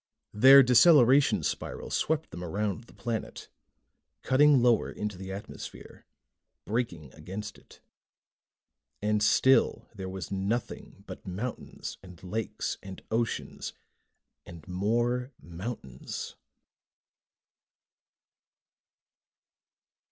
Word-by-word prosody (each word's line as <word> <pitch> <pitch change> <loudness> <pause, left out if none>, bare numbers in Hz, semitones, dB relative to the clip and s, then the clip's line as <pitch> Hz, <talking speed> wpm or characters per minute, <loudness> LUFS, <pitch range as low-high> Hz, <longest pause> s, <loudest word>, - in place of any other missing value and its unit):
Their 135 +6 +9
deceleration 135 +1 +6
spiral - - -4
swept 160 0 -1
them 90 - -7
around 100 +5 -3
the - - -18
planet, 115 -2 -5 0.7
cutting 140 +1 +5
lower 120 -2 +3
into 105 -1 -4
the 95 +1 -8
atmosphere, 100 +2 -9 0.6
braking 90 - -3
against 100 +6 -7
it. - - -20 1.2
And 105 0 +1
still 130 +5 +3
there 95 -3 -6
was 95 -2 -6
nothing 100 +4 -3
but - - -10
mountains 105 +7 -6
and 90 -2 -14
lakes 110 +4 -3
and 95 -1 -10
oceans 115 +1 -2 0.7
and 85 -2 -12
more 120 +7 0
mountains. 85 - -7
105 Hz, 90 wpm, -29 LUFS, 95-125 Hz, 1.2 s, Their